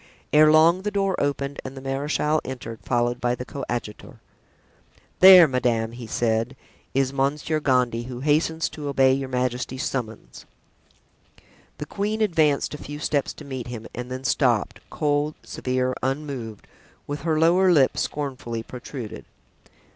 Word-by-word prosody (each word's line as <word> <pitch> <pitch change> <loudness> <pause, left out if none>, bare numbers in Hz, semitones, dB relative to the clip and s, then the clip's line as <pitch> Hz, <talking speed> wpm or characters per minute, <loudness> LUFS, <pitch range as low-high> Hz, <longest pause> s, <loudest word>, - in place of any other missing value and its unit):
Ere 155 0 +7
long 165 +4 +5
the 210 - -2
door 195 -2 0
opened 140 0 -2
and 135 +1 -8
the - - -5
marechal 145 +3 -1
entered, 120 -4 -7
followed 120 0 0
by 120 0 +1
the 125 - -7
coadjutor. 120 -6 -6 1.0
"There, 185 -3 +10
madame," 120 -4 0
he 120 -1 -9
said, 115 +2 0 0.4
"is 135 0 +1
Monsieur 145 +3 0
Gondy, 125 -5 +1
who 125 0 -7
hastens 155 +2 +1
to 150 -2 -7
obey 135 -2 +4
your 135 0 -2
majesty's 125 +1 -2
summons." 110 - -5 1.3
The 150 - -5
queen 210 +6 -2
advanced 160 -11 +2
a 150 - -7
few 145 +1 -7
steps 145 -2 -1
to 150 - -12
meet 130 -4 -6
him, 115 -2 -7
and 125 +1 -6
then 130 +1 -6
stopped, 120 -5 +1
cold, 150 0 0
severe, 130 0 -2
unmoved, 130 -5 -4 0.4
with 145 +1 -5
her 160 -2 0
lower 180 +4 +4
lip 140 -6 +4
scornfully 130 -6 -3
protruded. 125 -1 -8
135 Hz, 145 wpm, -24 LUFS, 125-150 Hz, 1.3 s, There